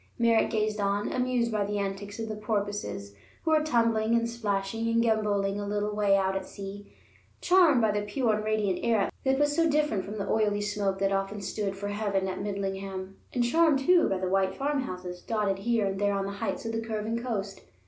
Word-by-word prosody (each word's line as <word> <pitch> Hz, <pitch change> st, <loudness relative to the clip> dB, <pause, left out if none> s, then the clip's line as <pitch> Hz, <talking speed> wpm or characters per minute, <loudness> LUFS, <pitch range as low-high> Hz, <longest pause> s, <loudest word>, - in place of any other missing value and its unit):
Merritt 230 Hz, -1 st, +3 dB
gazed 215 Hz, -1 st, 0 dB
on, 200 Hz, 0 st, 0 dB
amused 250 Hz, -2 st, +1 dB
by 210 Hz, -2 st, +1 dB
the 205 Hz, +1 st, -2 dB
antics 200 Hz, 0 st, -4 dB
of 225 Hz, -1 st, -4 dB
the 215 Hz, -, -4 dB
porpoises 205 Hz, -, -3 dB, 0.3 s
who 320 Hz, -, +1 dB
were 310 Hz, -1 st, +5 dB
tumbling 230 Hz, -5 st, +2 dB
and 230 Hz, 0 st, +2 dB
splashing 225 Hz, -1 st, -2 dB
and 230 Hz, 0 st, +2 dB
gamboling 210 Hz, -3 st, +1 dB
a 205 Hz, -, -4 dB
little 205 Hz, 0 st, -1 dB
way 205 Hz, -1 st, +4 dB
out 190 Hz, 0 st, +1 dB
at 190 Hz, -1 st, -3 dB
sea, 200 Hz, +1 st, -9 dB, 0.5 s
charmed 350 Hz, -8 st, +5 dB
by 220 Hz, -1 st, +3 dB
the 205 Hz, 0 st, 0 dB
pure 215 Hz, +3 st, 0 dB
and 215 Hz, 0 st, -1 dB
radiant 215 Hz, -4 st, 0 dB
air 225 Hz, -4 st, +2 dB
that 265 Hz, 0 st, +3 dB
was 290 Hz, +1 st, +2 dB
so 330 Hz, -1 st, +3 dB
different 295 Hz, -10 st, +1 dB
from 210 Hz, +2 st, -6 dB
the 200 Hz, -, -3 dB
oily 210 Hz, -2 st, +1 dB
smoke 205 Hz, -2 st, -1 dB
that 195 Hz, 0 st, +1 dB
often 195 Hz, +1 st, -1 dB
stood 200 Hz, -1 st, -3 dB
for 205 Hz, +1 st, -4 dB
heaven 205 Hz, -2 st, -1 dB
at 185 Hz, 0 st, -4 dB
Midlingham, 195 Hz, -1 st, -4 dB
and 245 Hz, -, +1 dB
charmed, 315 Hz, +4 st, +4 dB
too, 345 Hz, +6 st, +4 dB
by 195 Hz, -, 0 dB
the 185 Hz, 0 st, -2 dB
white 190 Hz, 0 st, +1 dB
farmhouses 185 Hz, -11 st, -3 dB
dotted 210 Hz, -4 st, -1 dB
here 225 Hz, 0 st, +1 dB
and 195 Hz, 0 st, -2 dB
there 205 Hz, 0 st, +2 dB
on 195 Hz, 0 st, -1 dB
the 200 Hz, -, -3 dB
heights 225 Hz, -, -2 dB
of 225 Hz, -, -2 dB
the 225 Hz, 0 st, -2 dB
curving 225 Hz, +1 st, -3 dB
coast. 205 Hz, -5 st, -4 dB
210 Hz, 210 wpm, -28 LUFS, 195-230 Hz, 0.5 s, were